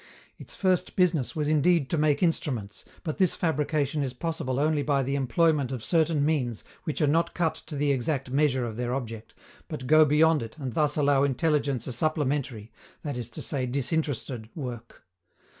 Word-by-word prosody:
Its - - -11
first 185 -2 0
business 175 -8 +1
was 150 -2 -1
indeed 155 0 +3
to - - -1
make 150 0 +2
instruments, 120 - -1 0.2
but 155 -4 -4
this 185 -3 +3
fabrication 150 -2 0
is 130 -3 -2
possible 135 -4 -2
only 150 0 +2
by 140 -2 +1
the 135 +2 -2
employment 140 +1 +2
of 125 -4 -4
certain 160 -3 +2
means 130 -8 -1 0.2
which 155 +1 -3
are - - +5
not 165 +4 +1
cut 165 -3 +1
to 150 - -9
the 145 0 +1
exact 135 0 -1
measure 135 -3 +2
of 110 -2 -6
their 125 +1 -1
object, 115 -4 -6 0.3
but 130 - -6
go 155 +4 +6
beyond 155 +1 +4
it 115 +5 -8
and 130 -5 -5
thus 150 +2 +1
allow 145 -2 +3
intelligence 140 -2 0
a 130 - -4
supplementary 135 -5 -1 0.3
that 145 -3 -3
is 120 -2 -5
to - - -5
say 130 -4 -2
disinterested 135 -4 -2
work. 120 -6 -7
145 Hz, 180 wpm, -27 LUFS, 125-155 Hz, 0.3 s, go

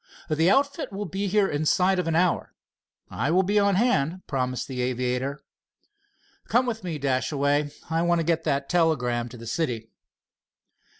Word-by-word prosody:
"The 160 +3 +3
outfit 280 +4 +1
will 200 +1 -4
be 195 +3 -3
here 200 0 +3
inside 180 +5 +2
of 180 - -1
an 165 - 0
hour." 175 +1 +1 0.6
"I 130 +6 -1
will 185 +4 +4
be 205 +3 +2
on 200 -1 +3
hand," 185 - +1
promised 130 -3 -2
the 130 -2 -4
aviator. 125 +2 -2 1.0
"Come 245 +2 +3
with 225 -4 -3
me, 170 -4 -3
Dashaway. 140 +2 0 0.2
I 165 0 0
want 175 0 +2
to 165 - -1
get 165 0 +1
that 140 -2 0
telegram 125 -9 +1
to 120 - -11
the 115 - -10
city." 115 -4 -3
160 Hz, 165 wpm, -25 LUFS, 130-185 Hz, 1.0 s, will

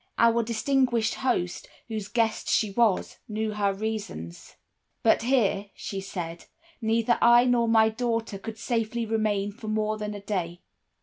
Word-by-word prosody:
Our 235 0 +4
distinguished 235 0 +1
host, 235 -9 -1 0.2
whose 215 -3 -4
guest 225 -1 0
she 215 -3 +2
was, 215 -2 +1
knew 215 0 -2
her 205 -1 +1
reasons. 195 - -5 0.5
"'But 225 - +4
here,' 225 -5 +1
she 195 -1 -5
said, 175 -3 -6 0.4
'neither 225 +1 +2
I 240 +1 +7
nor 240 -2 +3
my 220 -1 +5
daughter 230 -3 -2
could 220 +2 -7
safely 230 0 -1
remain 215 -2 0
for 220 +1 -10
more 215 0 -1
than 210 0 -4
a - - -6
day. 180 -4 -3
220 Hz, 145 wpm, -27 LUFS, 205-230 Hz, 0.5 s, I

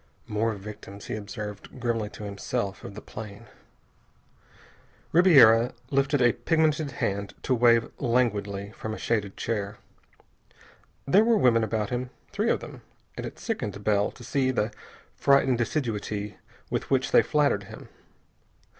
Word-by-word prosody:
"More 110 +2 0
victims," 100 0 -10
he - - -4
observed 105 +3 -7
grimly 115 -3 -1
to 105 - -10
himself, 100 +1 -3
of 100 - -8
the 105 - -9
plane. 105 +1 -9 1.7
Ribiera 135 -10 +7 0.2
lifted 135 -1 +2
a 120 - +6
pigmented 155 -3 +1
hand 100 0 -2
to 130 - +1
wave 115 -1 +4
languidly 105 -6 0
from 110 0 -5
a - - -8
shaded 105 -4 -1
chair. 105 -2 -3 1.3
There 195 +10 +5
were 230 0 +4
women 115 - +4
about 110 0 -1
him, 125 +1 -2 0.2
three - - 0
of - - +1
them, - - -10 0.3
and - - -5
it - - -10
sickened 100 0 -4
Bell 105 -1 +2
to 120 - -13
see 130 +2 0
the 115 -3 0 0.4
frightened 135 -3 +3
assiduity 105 -6 -2 0.3
with - - -2
which 135 -1 +1
they - - +7
flattered 145 -10 +1
him. - - -11
115 Hz, 140 wpm, -27 LUFS, 105-130 Hz, 1.7 s, Ribiera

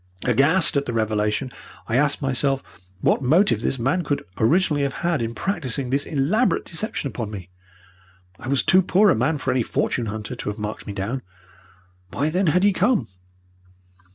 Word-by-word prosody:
Aghast 140 - +3
at 140 0 0
the 120 - -2
revelation, 110 +3 -1 0.4
I 115 - -1
asked 145 +2 +2
myself 135 0 0 0.4
what - - +2
motive 140 - +3
this 135 - -1
man 135 +9 0
could 145 -2 -2
originally 150 +5 +2
have 140 +2 -3
had 170 -5 +1
in 115 0 -3
practising 140 -9 -2
this 140 +1 0
elaborate 165 - +1
deception 170 -3 -3
upon 115 -4 -5
me. 95 -4 -9 0.9
I - - -9
was 140 0 +2
too 185 - +5
poor 190 +2 +4
a - - +3
man 140 +8 +1
for 135 -2 -1
any 130 0 +1
fortune 115 +1 -1
hunter 110 +3 -5
to 120 - -5
have 105 - -5
marked 105 0 -6
me 100 - -4
down. 110 +7 -3 0.9
Why, 150 +8 -1
then, 185 +2 +1
had 180 +4 +3
he 205 0 +4
come? 240 - +1
135 Hz, 180 wpm, -23 LUFS, 115-165 Hz, 0.9 s, too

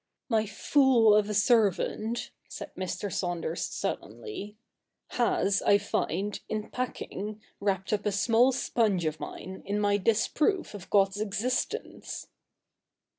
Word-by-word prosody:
' - - -60
My 215 0 +1
fool 235 0 +4
of 210 0 +3
a - - -1
servant,' 220 +1 +2 0.2
said - - -7
Mr. 185 +1 -4
Saunders 175 -2 -2
sullenly, 220 - -5 0.3
' - - -57
has, 200 -4 +1
I 200 - +5
find, 205 -1 -2
in 215 -1 -3
packing, 215 -4 -4 0.2
wrapped 195 -1 -1
up 210 0 0
a - - +2
small 230 +6 +4
sponge 220 -8 +1
of 155 0 -2
mine 190 0 -7
in 200 +2 -1
my 205 -1 +3
disproof 230 - +1
of 200 -3 -9
God's 195 -1 +3
existence.' 250 - -2
210 Hz, 130 wpm, -29 LUFS, 195-230 Hz, 0.3 s, I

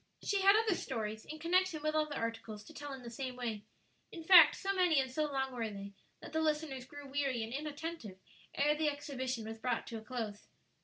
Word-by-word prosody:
She 400 -2 +1
had 395 +1 +7
other 440 -2 +3
stories, 220 -9 -4
in 310 - -7
connection 340 0 +1
with 310 0 +1
other 305 -1 0
articles, 225 -3 -4
to - - -13
tell 290 0 -7
in 265 -2 -7
the 235 - -7
same 255 +1 -4
way. 225 -4 -4 0.5
In 330 - -8
fact, 340 -2 +9
so 390 0 -1
many 360 -6 +4
and 260 -1 -1
so 305 +3 0
long 265 -1 -1
were 230 -3 -2
they, 200 -1 -8 0.3
that - - -10
the 320 - +1
listeners 300 -4 -1
grew 290 +2 -10
weary 270 -4 0
and 225 +2 -6
inattentive 295 - -5 0.4
ere 295 +1 +3
the 305 0 +1
exhibition 260 -5 -4
was 225 0 -6
brought 245 0 -1
to 230 -1 -6
a - - -12
close. 220 -3 -5
275 Hz, 215 wpm, -34 LUFS, 230-310 Hz, 0.5 s, fact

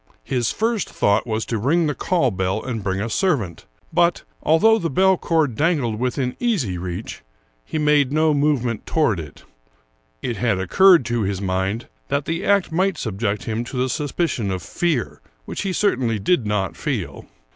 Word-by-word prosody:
His 125 -4 0
first 225 -2 -1
thought 100 +4 +1
was 110 -1 -1
to 115 - -2
ring 160 +9 +2
the 150 - 0
call 155 -3 +1
bell 95 +2 -1
and 120 -4 -4
bring 95 0 -1
a 105 - -2
servant; 115 - -1 0.3
but, 170 +1 +2 0.2
although 220 +9 +4
the 165 - -2
bell 190 +6 +4
cord 160 -7 +1
dangled 140 -6 0
within 125 0 -1
easy 185 - 0
reach, 90 +3 -6 0.4
he 155 - -4
made 150 -3 +3
no 155 +1 +3
movement 140 -6 0
toward 120 - +1
it; 75 -3 -10 0.8
it 120 - -2
had 115 -5 +1
occurred 170 - +5
to 120 +1 -1
his 100 -2 -1
mind 95 +4 -2 0.2
that 140 0 -1
the 165 +1 -2
act 200 -3 +2
might 185 +1 +1
subject 105 -3 -2
him 115 +1 -2
to 125 - -6
the 130 +1 +1
suspicion 145 - -1
of 95 -1 -3
fear, 165 -8 -2 0.2
which - - -5
he 195 - -1
certainly 125 - +1
did 115 - +1
not 100 -3 -1
feel. - - -4
125 Hz, 175 wpm, -21 LUFS, 105-165 Hz, 0.8 s, occurred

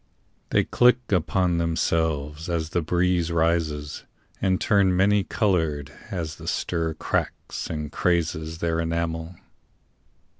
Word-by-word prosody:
They - - +3
click 125 -1 +3
upon 90 0 +2
themselves 80 -2 -1
As 80 -2 -2
the 85 - +1
breeze 90 +1 +1
rises, 80 -3 0 0.4
and 95 -1 +2
turn 95 -3 +3
many 100 +1 +4
colored 80 -9 0 0.2
As 85 -5 -4
the - - -10
stir 80 -2 -1
cracks - - -3
and 75 -2 -4
crazes 80 -2 0
their 85 0 -1
enamel. 85 +1 -2
85 Hz, 115 wpm, -25 LUFS, 80-90 Hz, 0.4 s, many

